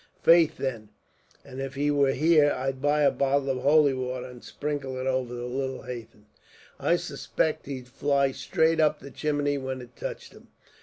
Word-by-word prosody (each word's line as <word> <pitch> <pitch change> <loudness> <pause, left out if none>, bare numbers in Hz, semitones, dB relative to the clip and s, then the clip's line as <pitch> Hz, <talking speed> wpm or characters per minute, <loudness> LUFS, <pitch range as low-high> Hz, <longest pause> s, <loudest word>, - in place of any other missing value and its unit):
Faith, 165 -2 +5
then, 115 -6 -4 0.6
and 130 +1 -7
if 135 0 -5
he 145 +1 +1
were 140 -2 +3
here, 150 +1 +4
I'd 130 0 -3
buy 145 +1 +2
a 140 - +5
bottle 140 0 +1
of 130 - -2
holy 145 +1 +4
water, 130 -1 -4
and 125 -1 -11
sprinkle 145 -3 -4
it 130 - -4
over 130 -2 -1
the 120 0 -5
little 130 +1 -3
hathen. 115 -4 -9 0.5
I - - +2
suspict 155 - -2
he'd 130 -3 -6
fly 140 +1 +1
straight 160 +4 +1
up 155 -1 +3
the 140 - -11
chimney, 145 -1 -1
when 130 0 -4
it 125 -1 -12
touched - - -7
him." - - -17
135 Hz, 185 wpm, -27 LUFS, 130-145 Hz, 0.6 s, Faith